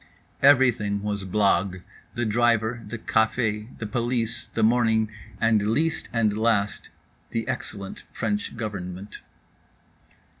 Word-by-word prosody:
Everything 125 -7 +4
was 100 -2 -2
blague. 95 -2 +1 0.3
The 120 - 0
driver, 115 +1 +2
the 120 - -5
café, 110 -1 0
the 110 - -5
police, 115 0 -2
the 115 - +1
morning, 110 -1 +3 0.3
and 110 -2 +3
least 160 +8 0
and 110 -3 +1
last 110 -2 0 0.4
the 115 -1 -3
excellent 100 -1 -4
French 205 - -2
Government. 100 -3 -6
110 Hz, 110 wpm, -25 LUFS, 105-120 Hz, 0.4 s, Everything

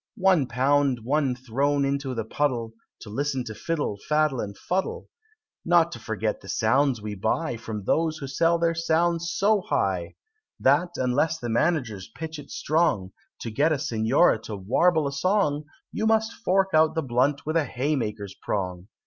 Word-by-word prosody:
One 185 - +3
pound 135 0 +2
one 135 0 +1
thrown 140 +3 0
into 140 -1 -2
the 115 -2 -3
puddle, 120 -3 -1 0.3
To 105 - -9
listen 135 +2 -1
to 110 -2 -7
Fiddle, 145 -4 -3
Faddle, 150 -4 +2
and 100 -1 -5
Fuddle! 185 +1 -3 0.5
Not 170 -1 +4
to - - -7
forget 110 -1 -3
the - - -12
sounds 130 +2 +2
we 105 -1 -4
buy 115 - -1
From 110 -2 -6
those 160 +8 +1
who 140 - -6
sell 165 +5 +2
their 170 0 +1
sounds 170 +1 +1
so 200 +5 +2
high, 90 - -1 0.4
That, 145 +7 +3
unless 130 +6 +1
the 120 -5 -5
Managers 120 - 0
pitch 160 -1 -6
it 145 - -11
strong, 145 - 0 0.3
To 115 - -4
get 145 +8 +2
a 155 - +2
Signora 115 +3 +2
to 110 -1 -7
warble 155 - +2
a 140 - -1
song, 150 -2 +1 0.3
You 220 - -1
must 220 0 +2
fork 190 -1 +1
out 155 0 +4
the 160 - 0
blunt 135 +4 +1
with 155 +2 -2
a 160 -3 +3
haymaker's 115 -8 -2
prong! 90 -2 -4
140 Hz, 170 wpm, -25 LUFS, 115-160 Hz, 0.5 s, Not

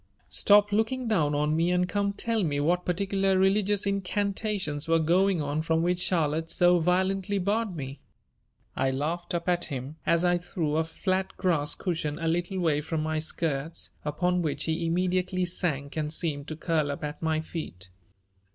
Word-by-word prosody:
"Stop 205 0 +4
looking 225 +4 0
down 155 -9 +2
on 150 +1 +1
me 165 +2 +2
and 180 0 +2
come 200 +1 0
tell 220 +1 -1
me 145 -4 0
what 175 +5 +1
particular 195 +1 +1
religious 200 +1 +2
incantations 200 -5 -1
were 165 0 +4
going 175 +1 +2
on 145 +2 -1
from 160 0 +1
which 180 +1 +1
Charlotte 160 -3 +1
so 175 0 +4
violently 190 +3 +1
barred 205 +1 0
me," 135 -2 -6 0.8
I 135 - +1
laughed 155 +7 -2
up 170 +1 -3
at 175 -1 +2
him, 140 +1 -6
as 170 +1 +2
I 175 0 +3
threw 160 -3 -2
a 160 - +3
flat 185 +3 -2
grass 155 -5 +2
cushion 160 -5 -2
a 165 - -2
little 175 +3 -1
way 155 -4 +1
from 155 +1 -2
my 155 0 -1
skirts, 160 0 -3
upon 180 +4 0
which 155 -4 -2
he 165 +1 -1
immediately 185 +1 0
sank 155 -6 -2
and 150 -1 -2
seemed 155 -3 -1
to 155 - -4
curl 160 -2 0
up 140 - -6
at 150 0 -5
my 160 -1 +1
feet. 125 - -6
170 Hz, 175 wpm, -27 LUFS, 155-190 Hz, 0.8 s, Stop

